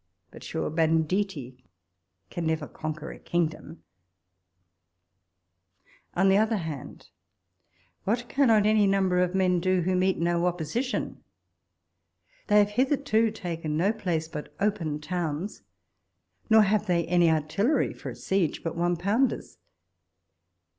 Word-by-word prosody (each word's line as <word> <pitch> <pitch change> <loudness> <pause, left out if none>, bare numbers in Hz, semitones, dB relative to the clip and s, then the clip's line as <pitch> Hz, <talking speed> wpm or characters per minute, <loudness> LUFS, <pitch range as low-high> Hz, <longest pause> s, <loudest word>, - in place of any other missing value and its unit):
But, - - -12
sure, - - -3
banditti 160 -4 0 0.7
can 170 -2 -3
never 160 -2 -1
con 155 -1 -5
quer 155 +1 -8
a - - -11
kingdom! 165 -1 -3 2.3
On 190 +2 +3
the 195 0 +5
other 220 0 +2
hand, 160 -7 -7 0.9
what 240 +4 -1
cannot 230 -7 +3
any 215 -1 +4
number 190 -2 +2
of 180 +1 +1
men 185 -2 +2
do 185 +1 +1
who 185 +2 0
meet 185 +1 +2
no 170 +1 +1
opposition 180 - -3 0.6
'? - - -39
They 210 - +4
have 205 0 +5
hitherto 255 -2 +2
taken 165 -7 -4
no 195 +6 +2
place 175 -7 -2
but 150 -2 -7
open 185 -7 -1
towns, 165 - -3 0.9
nor 220 -1 +7
have 210 +1 +1
they 170 -2 +1
any 175 0 +3
artillery 160 - +1
for - - -8
a - - -7
siege 190 -5 -1
but 165 - -3
one 175 +1 +1
pounders. 210 +10 0
180 Hz, 130 wpm, -27 LUFS, 160-210 Hz, 2.3 s, nor